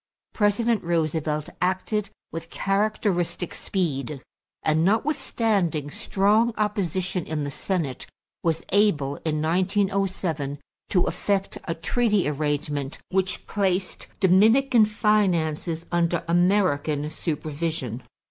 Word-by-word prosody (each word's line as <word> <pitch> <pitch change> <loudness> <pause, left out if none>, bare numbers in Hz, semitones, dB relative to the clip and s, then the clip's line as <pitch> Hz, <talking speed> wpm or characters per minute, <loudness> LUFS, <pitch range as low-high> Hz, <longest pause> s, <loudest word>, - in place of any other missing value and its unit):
President 215 +1 +2
Roosevelt 155 -2 0
acted 190 +3 0 0.2
with 165 0 -6
characteristic 195 -4 0
speed, 150 -7 -2 0.4
and 155 +1 +2
notwithstanding 200 - +1
strong 215 +7 +2
opposition 190 -4 -1
in 155 -2 -2
the 145 - -3
Senate 155 -5 -2 0.3
was 165 -1 0
able, 160 -9 +2
in 155 -1 -2
1907, 185 -4 0 0.3
to 180 -2 +3
effect 195 -1 -1
a 165 - -2
treaty 210 +2 +1
arrangement 145 -1 -2
which 185 -1 0
placed 190 -3 -1
Dominican 220 +6 +5
finances 175 -7 +1
under 170 -1 +1
American 165 -5 +2
supervision. 155 -6 -3
175 Hz, 95 wpm, -25 LUFS, 155-200 Hz, 0.4 s, Dominican